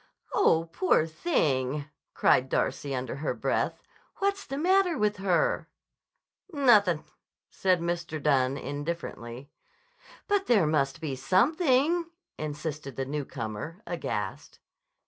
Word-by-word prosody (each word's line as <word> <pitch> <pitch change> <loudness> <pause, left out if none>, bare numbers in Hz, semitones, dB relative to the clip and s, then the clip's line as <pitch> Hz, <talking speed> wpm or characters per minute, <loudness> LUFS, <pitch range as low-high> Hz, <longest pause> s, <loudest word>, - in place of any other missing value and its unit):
"Oh, 165 +1 +3
poor 360 - +3
thing!" 150 - 0 0.3
cried 130 +1 +3
Darcy 135 +1 -1
under 130 +1 -4
her 150 - -2
breath. - - -1 0.3
"What's 400 0 -1
the 275 - -4
matter 360 +1 +3
with 210 -1 +1
her?" 200 - +1 0.8
"Nothin'," 215 - +4 0.5
said 185 -2 +1
Mr. 170 -2 -2
Dunne 135 -2 +2
indifferently. 140 -3 -5 0.8
"But 405 -1 +1
there 210 -9 +4
must 150 0 0
be 145 -4 -3
something," 290 - +2 0.3
insisted 150 -2 -5
the 135 - -2
newcomer 140 - -5
aghast. 105 - -4
160 Hz, 105 wpm, -28 LUFS, -, 0.8 s, Nothin